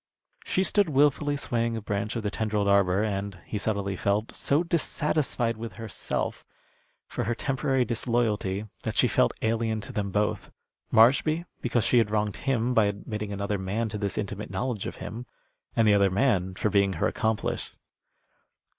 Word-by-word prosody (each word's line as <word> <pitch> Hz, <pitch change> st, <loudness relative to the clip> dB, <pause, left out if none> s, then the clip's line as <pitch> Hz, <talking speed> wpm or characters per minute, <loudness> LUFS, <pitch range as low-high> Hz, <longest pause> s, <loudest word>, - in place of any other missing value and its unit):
She 185 Hz, -, +1 dB
stood 200 Hz, -2 st, +3 dB
wilfully 145 Hz, 0 st, +2 dB
swaying 115 Hz, -3 st, -1 dB
a -, -, -4 dB
branch 105 Hz, +2 st, -2 dB
of 115 Hz, -, -2 dB
the 105 Hz, -, -1 dB
tendrilled 105 Hz, -2 st, -1 dB
arbor, 100 Hz, 0 st, +3 dB
and, 100 Hz, -2 st, -3 dB
he 105 Hz, -, -3 dB
subtly 100 Hz, -2 st, -1 dB
felt, 100 Hz, +4 st, 0 dB
so 145 Hz, +4 st, +2 dB
dissatisfied 150 Hz, -8 st, 0 dB
with 115 Hz, +1 st, -6 dB
herself 115 Hz, -2 st, -4 dB, 0.6 s
for -, -, -4 dB
her 120 Hz, +2 st, 0 dB
temporary 135 Hz, 0 st, 0 dB
disloyalty 110 Hz, -4 st, 0 dB, 0.2 s
that -, -, -3 dB
she -, -, +4 dB
felt -, -, +3 dB
alien 110 Hz, 0 st, 0 dB
to 100 Hz, -, -8 dB
them 100 Hz, -1 st, -1 dB
both: 105 Hz, +2 st, -1 dB, 0.4 s
Marshby 140 Hz, +9 st, +4 dB, 0.2 s
because 120 Hz, -2 st, +1 dB
she 125 Hz, -, +4 dB
had 110 Hz, -3 st, +2 dB
wronged 105 Hz, -1 st, 0 dB
him 125 Hz, -3 st, 0 dB
by 110 Hz, -3 st, +5 dB
admitting 105 Hz, +1 st, -4 dB
another 100 Hz, 0 st, -2 dB
man 105 Hz, +5 st, -2 dB
to 105 Hz, -, -5 dB
this 100 Hz, -1 st, -2 dB
intimate 105 Hz, 0 st, -4 dB
knowledge 120 Hz, -5 st, -2 dB
of -, -, -6 dB
him, 120 Hz, +3 st, -7 dB, 0.5 s
and 115 Hz, -1 st, +4 dB
the 105 Hz, -, +6 dB
other 100 Hz, -1 st, +4 dB
man 95 Hz, -3 st, +1 dB
for 105 Hz, -, 0 dB
being 100 Hz, -1 st, +3 dB
her 80 Hz, -, -1 dB
accomplice. 110 Hz, -2 st, -2 dB
110 Hz, 170 wpm, -27 LUFS, 100-120 Hz, 0.6 s, the